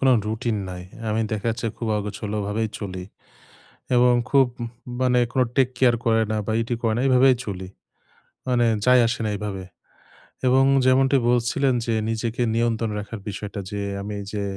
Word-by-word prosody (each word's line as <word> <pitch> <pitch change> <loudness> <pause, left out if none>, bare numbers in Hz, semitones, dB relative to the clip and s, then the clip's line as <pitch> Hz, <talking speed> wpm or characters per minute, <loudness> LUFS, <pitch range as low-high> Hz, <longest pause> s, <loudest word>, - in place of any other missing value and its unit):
কোনো 135 -1 +5
রুটিন 110 +1 -1
নাই। 90 -1 -7 0.3
আমি 110 +1 0
দেখাচ্ছে 115 +2 -2
খুব 115 - -4
অগোছালোভাবেই 105 +1 -3
চলি। 95 -3 -6 0.9
এবং 125 0 +5 0.2
খুব 135 -2 +5 0.2
উ - - -1 0.4
মানে 125 -1 +3
কোনো 130 -1 +3
টেক 130 -2 +4
কেয়ার 125 -2 +5
করে 115 -1 +3
না - - 0
বা 110 - -1
ই - - +2
টি 120 - 0
করে 115 - +2
না, - - 0
এইভাবেই 130 0 +5
চলি। 95 -2 -5 0.8
মানে 120 -2 +3 0.2
যাই 125 0 +6
আসে 120 - -2
না - - 0
এইভাবে। 100 -2 -5 0.8
এবং 130 +1 +5 0.2
যেমনটি 135 +1 +4
বলছিলেন 125 +2 +2
যে 115 - 0
নিজেকে 115 +1 -2
নিয়ন্ত্রণ 115 -1 0
রাখার 105 +2 -6
বিষয়টা 100 0 -5
যে 100 - -4 0.2
আমি 100 +1 -5
এইযে 100 +1 -4
115 Hz, 165 wpm, -23 LUFS, 105-125 Hz, 0.9 s, যাই